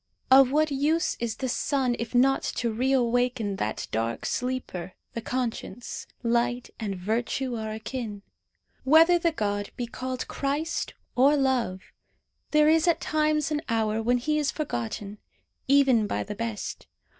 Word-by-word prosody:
Of 265 -1 +8
what 305 +1 +2
use 300 +4 +1
is 230 -2 -2
the 260 - -3
sun 255 0 0
if 235 +2 -4
not 270 +2 +4
to 235 - 0
reawaken 245 -3 +1
that 110 - -3
dark 115 +1 -2
sleeper 250 -8 -3 0.2
the 230 - -4
conscience? 245 0 -4 0.2
Light 240 +1 0
and 205 -4 -3
virtue 235 +6 -2
are 220 -1 -4
akin. 220 -2 -5 0.6
Whether 325 +5 +6
the 335 0 +2
god 205 -7 -2
be 245 - -2
called 255 +2 -5
Christ 295 +4 -2 0.2
or 275 +4 +5
Love, 255 -9 +1 0.7
there 300 0 +4
is 320 +2 +4
at 340 - +3
times 305 0 +1
an 300 0 0
hour 220 -1 +1
when 245 +2 +2
he 305 +5 0
is 295 -2 +1
forgotten, 205 - -4 0.5
even 265 -6 +4
by - - -1
the 210 - -6
best. 225 0 -5
245 Hz, 145 wpm, -27 LUFS, 220-280 Hz, 0.7 s, Of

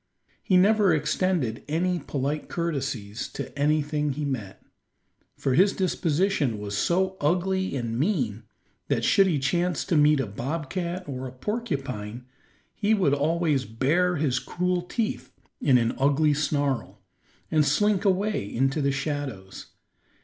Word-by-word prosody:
He 185 - +3
never 205 0 +4
extended 150 -6 0
any 175 +4 0
polite 145 +1 -3
courtesies 135 -10 -3
to - - -6
anything 150 0 +1
he 150 +2 -3
met, 115 -9 -5 0.7
for 135 - 0
his 190 +8 +4
disposition 170 - 0
was 100 0 -5
so 190 - +1
ugly 185 +3 0
and 120 -2 -2
mean 130 - 0 0.5
that - - 0
should 195 -1 +5
he 165 -5 +1
chance 175 +6 0
to 170 - 0
meet 150 -1 +5
a 135 - 0
bobcat 165 - -4
or 130 -2 -5
a - - -8
porcupine, 130 - -4 0.5
he 215 +1 +2
would 180 -9 +2
always 150 -1 +1
bare 155 +11 +1
his 140 -5 +1
cruel 180 0 -1
teeth 180 - -3 0.3
in 130 -3 +5
an 115 -1 +1
ugly 145 +2 +3
snarl, 140 -9 -1 0.5
and 155 -2 +4
slink 200 +8 +2
away 195 - 0
into 135 +5 +1
the 140 0 +2
shadows. 135 -9 -4
150 Hz, 135 wpm, -26 LUFS, 130-180 Hz, 0.7 s, should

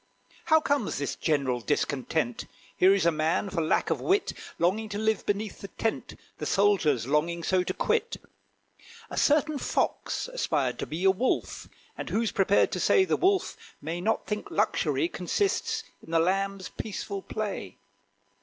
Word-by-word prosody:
How 315 -1 +5
comes 285 -7 0
this 140 0 -2
general 135 -5 0
discontent? 140 -1 -1 0.3
Here 185 +1 +5
is 190 -4 +1
a 170 - +5
man, 160 +5 0
for 170 - 0
lack 160 - +1
of - - 0
wit, 400 +2 +1 0.2
Longing 210 +6 +1
to 205 - -4
live 220 +1 0
beneath 205 +1 -2
the 200 - -6
tent 225 +2 -3 0.2
The - - -3
soldier's 195 - +3
longing 165 +5 0
so 185 +2 +2
to 180 - -2
quit. - - 0 0.9
A - - -4
certain 300 0 +3
Fox - - -1
aspired - - -1
to - - -3
be 160 +4 -4
A 190 - +6
Wolf: 245 +7 -1 0.3
and - - -6
who's 225 -2 0
prepared 195 +1 +3
to - - -2
say 385 - +4
The - - +1
Wolf 380 +1 +1 0.2
may 165 +4 -4
not 220 +4 0
think 210 0 -4
luxury 340 - +1
Consists 445 +4 -1 0.2
in - - -15
the 165 0 +3
lamb's 195 +2 0
peaceful 200 -1 -5
play? 215 0 -5
195 Hz, 165 wpm, -28 LUFS, 165-225 Hz, 0.9 s, A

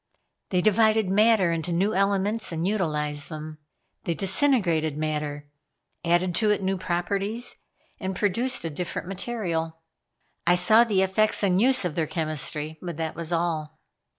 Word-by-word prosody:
They 180 -2 +1
divided 215 0 +3
matter 210 -3 +4
into 165 +1 -2
new 190 +5 +1
elements 200 +3 +1
and 165 +2 -2
utilized 150 -7 -1
them. 155 -1 -7 0.5
They 170 - -1
disintegrated 190 - +2
matter, 150 -1 -3 0.6
added 175 +1 +2
to 215 - +2
it 205 -1 +1
new 190 +1 0
properties 195 +6 -2 0.4
and 190 -1 -3
produced 225 +3 -1
a 165 - -2
different 175 +2 -5
material. 180 -5 -3 0.7
I 175 - +6
saw 215 +6 +6
the 200 -4 +2
effects 210 +3 +1
and 190 -1 +3
uses 260 -4 +3
of 175 - -2
their 160 0 -1
chemistry, 155 -1 -3
but 175 -4 -6
that 160 -1 -3
was 170 0 -6
all. 165 -3 -1
180 Hz, 150 wpm, -25 LUFS, 160-205 Hz, 0.7 s, I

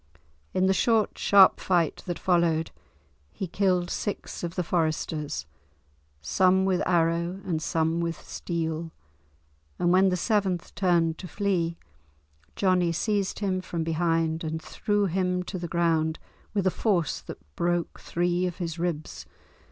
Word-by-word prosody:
In 185 - +1
the 190 - +4
short, 220 +2 +2
sharp 195 -2 +6
fight 175 -4 +1
that 175 - -2
followed, 170 -3 +1 0.6
he 190 - -4
killed 180 -1 +1
six 205 -3 -4
of 170 -1 -4
the 180 - 0
foresters, 155 -3 -1 0.8
some 190 - +3
with 185 -2 +1
arrow, 170 +1 +1
and 165 -4 -1
some 160 +2 0
with 170 -1 -2
steel; 165 -1 -3 0.9
and 175 - +2
when 190 +1 +5
the 180 - 0
seventh 190 -3 0
turned 170 -4 +2
to 185 - -7
flee, 175 -3 -1 0.8
Johnie 180 -3 +2
seized 200 +2 0
him 190 -2 0
from 170 -2 -3
behind 165 0 0
and 160 0 -3
threw 205 +5 -1
him 180 0 0
on 180 - -1
to 185 +1 -5
the 170 - -4
ground 165 -2 +1 0.4
with 200 -2 +1
a 185 - +4
force 175 - 0
that - - -8 0.2
broke 175 -1 -1
three 175 +1 0
of 175 - -5
his 170 -3 -4
ribs. 165 -3 -3
175 Hz, 145 wpm, -27 LUFS, 165-185 Hz, 0.9 s, sharp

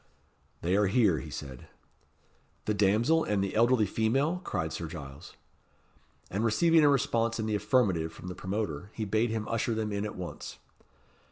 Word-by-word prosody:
"They 90 +3 +2
are 105 0 +3
here," 95 - +3
he - - -8
said. 65 -3 -8 1.0
"The 105 - +1
damsel 110 +11 +3
and 100 -2 0
the 100 - -3
elderly 120 0 +4
female?" 135 - 0
cried 80 - -2
Sir 85 - -4
Giles. 70 -4 -9 1.0
And 100 +4 -1
receiving 160 +9 +4
a 145 - +6
response 115 -4 +1
in 110 - -1
the 110 - -1
affirmative 100 -8 +1
from 90 - -11
the 90 - -4
promoter, 95 -3 -4
he 110 - -2
bade 110 +3 +1
him 110 -1 -3
usher 115 0 -1
them 110 -1 -2
in 100 0 -2
at 105 - -5
once. 90 -4 -7
105 Hz, 170 wpm, -29 LUFS, 95-115 Hz, 1.0 s, a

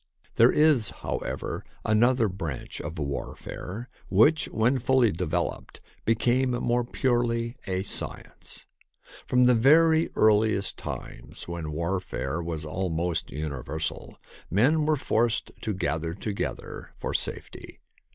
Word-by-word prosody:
There 115 +2 +7
is, 150 -8 +4
however, - - -4 0.2
another 115 +2 +4
branch 85 -8 -5
of 80 +3 -6
warfare 90 - -5 0.2
which, 125 +12 +4
when 120 +4 +1
fully 125 -2 +3
developed, 85 0 -3 0.3
became 120 +4 +2
more 120 0 +1
purely 120 -1 0
a 95 0 -1
science. - - -5 0.6
From 125 0 +4
the 125 0 +6
very 160 +7 +5
earliest 110 -2 +3
times, - - -8
when 85 -3 -4
war 85 +5 -1
fare 85 -3 -4
was 80 -2 -4
almost 85 0 -2
universal, 75 +1 -5 0.3
men 145 - +3
were 155 - +4
forced 115 -3 0
to 110 - -1
gather 80 -3 -2
together 100 0 -5
for - - -4
safety. - - -2
110 Hz, 115 wpm, -27 LUFS, 85-125 Hz, 0.6 s, There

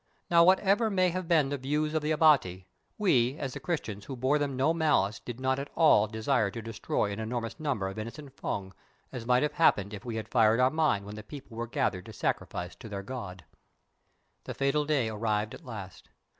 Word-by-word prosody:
Now, 170 -1 +7
whatever 195 +5 +4
may 185 -3 +2
have 180 0 -4
been 155 -5 +3
the 140 -1 -3
views 150 +4 -1
of 155 - +1
the 150 - -2
Abati, 145 - +3 0.3
we 135 - +2
as 135 -3 -4
Christians 110 - -3
who 135 - -6
bore 130 +4 +1
them 140 -2 -1
no 140 +5 +2
malice 150 -11 +1
did 120 0 -8
not 130 +1 0
at 140 - -5
all 130 -10 +5
desire 110 0 0
to 105 - -7
destroy 110 -2 -2
an 100 - -5
enormous 115 0 -4
number 135 -11 -1
of 95 +3 -6
innocent 135 +5 -8
Fung, 95 -7 -4 0.4
as 115 -2 -7
might 125 +1 +4
have 150 - 0
happened 105 - +3
if 105 - -7
we 120 -2 -5
had 110 -1 -4
fired 115 -1 +3
our 130 +1 +4
mine 155 -11 +1
when 105 +1 -8
the - - -6
people 130 +1 -11
were 120 +1 -3
gathered 95 -4 -1
to 110 - -9
sacrifice 90 -2 -3
to 110 - -10
their 100 -1 -5
god. 95 - -7 1.0
The - - -6
fatal 140 +2 +1
day 145 -6 +1
arrived 110 0 -1
at 165 - -11
last. 100 -7 -9
125 Hz, 210 wpm, -29 LUFS, 110-150 Hz, 1.0 s, Now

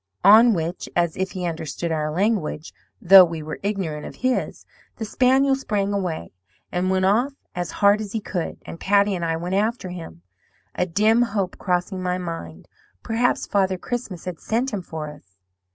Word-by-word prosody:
"On 220 +3 +7
which 170 +1 -3
(as 170 -2 +1
if 190 0 -3
he 180 -1 -4
understood 165 0 -3
our 155 -1 -1
language, 175 -3 -1 0.3
though 190 +1 +9
we 165 -3 -3
were 155 - -6
ignorant 190 -7 -3
of - - -8
his) 255 -1 -1 0.3
the 225 - -5
spaniel 265 +4 +3
sprang 205 -6 -1
away, 175 - -3 0.4
and 180 +1 0
went 190 0 +2
off 235 +8 +2 0.2
as 175 -2 -3 0.2
hard 205 +1 +5
as 210 -2 -6
he 225 - 0
could; 180 -5 -4
and 165 - -8
Patty 200 +1 +3
and 175 -2 -3
I 165 -1 0
went 175 +3 -4
after 210 0 0
him, 165 - -9 0.5
a 180 - -1
dim 215 +6 +3
hope 205 -6 -1
crossing 180 +1 -1
my 180 0 -1
mind 165 - -7 0.4
'Perhaps 235 +2 0
Father 190 -2 +1
Christmas 210 -4 -5
has 180 -3 -6
sent 235 +3 -1
him 200 - -2
for 160 -3 -6
us.' 95 -11 -18
185 Hz, 180 wpm, -23 LUFS, 165-210 Hz, 0.5 s, though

